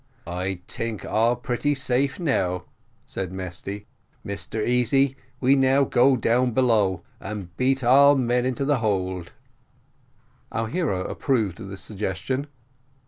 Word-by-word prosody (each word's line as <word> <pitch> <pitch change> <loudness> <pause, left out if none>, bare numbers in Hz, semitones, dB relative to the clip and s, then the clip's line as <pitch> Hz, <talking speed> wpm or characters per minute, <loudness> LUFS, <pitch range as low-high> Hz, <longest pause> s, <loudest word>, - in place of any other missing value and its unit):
"I 90 +1 -3
tink 115 -3 -4
all 115 +3 +2
pretty 125 +4 -1
safe 135 +2 0
now," 90 - 0 0.4
said 95 -2 -5
Mesty. 95 +2 -5 0.4
"Mr 105 +2 -3
Easy, 130 +2 +3 0.2
we 135 +2 +4
now 135 +1 +4
go 130 0 +4
down 120 +1 +2
below 105 -8 +2 0.2
and 95 -4 -7
beat 130 +3 +1
all 140 +4 +7
men 125 -2 +1
into 130 +1 -1
the 145 -2 +2
hold." 95 -5 -2 1.2
Our 110 +2 -2
hero 145 - -1
approved 110 -10 -1
of - - -7
this 95 0 -8
suggestion. 105 - -3
115 Hz, 130 wpm, -24 LUFS, 95-130 Hz, 1.2 s, all